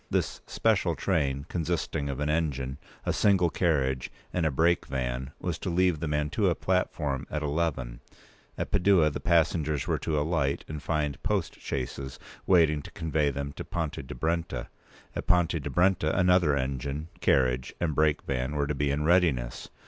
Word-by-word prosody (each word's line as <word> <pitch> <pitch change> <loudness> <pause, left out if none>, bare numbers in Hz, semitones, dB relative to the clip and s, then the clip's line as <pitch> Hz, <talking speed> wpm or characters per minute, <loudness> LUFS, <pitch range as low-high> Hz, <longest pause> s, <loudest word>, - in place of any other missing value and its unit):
This - - -1
special - - +1
train, 70 -3 0
consisting 80 -4 -2
of 70 -1 -3
an 75 - 0
engine, 70 -4 -1 0.3
a - - +1
single 95 -5 +3
carriage, 65 -7 0 0.2
and 85 -3 +1
a - - +2
break 85 +5 +2
van, 65 0 -2
was - - -3
to - - -3
leave 90 -2 +2
the 80 - -2
Mantua 75 +5 +1
platform 75 -7 -1
at 75 0 -2
eleven; 70 -5 -1 0.6
at - - -3
Padua 90 -5 +4
the - - -4
passengers 80 -3 +2
were - - 0
to 80 -2 -1
alight 75 -3 0
and 75 -2 -6
find 75 -1 -1
post - - -1
chaises 65 0 -4 0.3
waiting 80 -5 +4
to - - -10
convey 80 -3 0
them 70 +1 -4
to - - -6
Ponte 80 -3 -3
p. - - -3
212di 65 -2 -9
Brenta; 85 +2 -1 0.5
at - - -4
Ponte 85 -3 +3
di 70 - -4
Brenta 85 0 +2
another 90 -6 +4
engine, 70 +4 -3
carriage, 65 -2 +2
and 85 -3 0
break 75 0 +2
van 65 +2 -2
were 70 -1 +1
to 75 - -1
be 70 0 0
in 70 +2 0
readiness. 75 -8 +2
75 Hz, 170 wpm, -28 LUFS, 70-85 Hz, 0.6 s, Padua